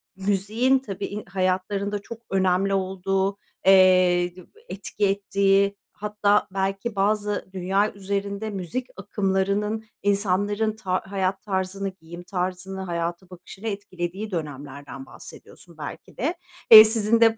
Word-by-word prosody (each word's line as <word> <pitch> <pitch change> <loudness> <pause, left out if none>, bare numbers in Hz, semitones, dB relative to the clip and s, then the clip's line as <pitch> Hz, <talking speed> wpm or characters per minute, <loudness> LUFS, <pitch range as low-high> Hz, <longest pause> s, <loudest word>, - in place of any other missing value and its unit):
müziğin 205 +7 +1
i - - -21
tabii, 205 -1 -5
hayatlarında 190 +2 -1
çok 230 +2 -10
önemli 190 +1 +2
olduğu, 190 +1 0 0.3
eee, 185 -2 +5
d 185 - -11 0.3
etki 205 +1 -2
ettiği, 200 0 +2 0.2
hatta 210 0 +1
belki 195 +3 -2
bazı 205 +1 0
dünya 195 +3 0
üzerinde 200 +2 -3
müzik 205 +6 -4
akımlarının 200 +2 -1 0.2
insanların 205 +2 +1
ta 185 -4 -1
hayat 190 0 -1
tarzını, 195 -1 -2
giyim 175 -1 -11
tarzını, 185 +1 -4
hayata 170 0 -3
bakışını 185 +4 -10
etkilediği 200 0 -4
dönemlerden 145 -4 -6
bahsediyorsun 170 -2 -13
belki 145 - -9
de. 310 +9 -1 0.4
Eee, 215 0 +13
sizin 225 +1 +2
de 225 -1 +5
195 Hz, 115 wpm, -24 LUFS, 185-205 Hz, 0.4 s, Eee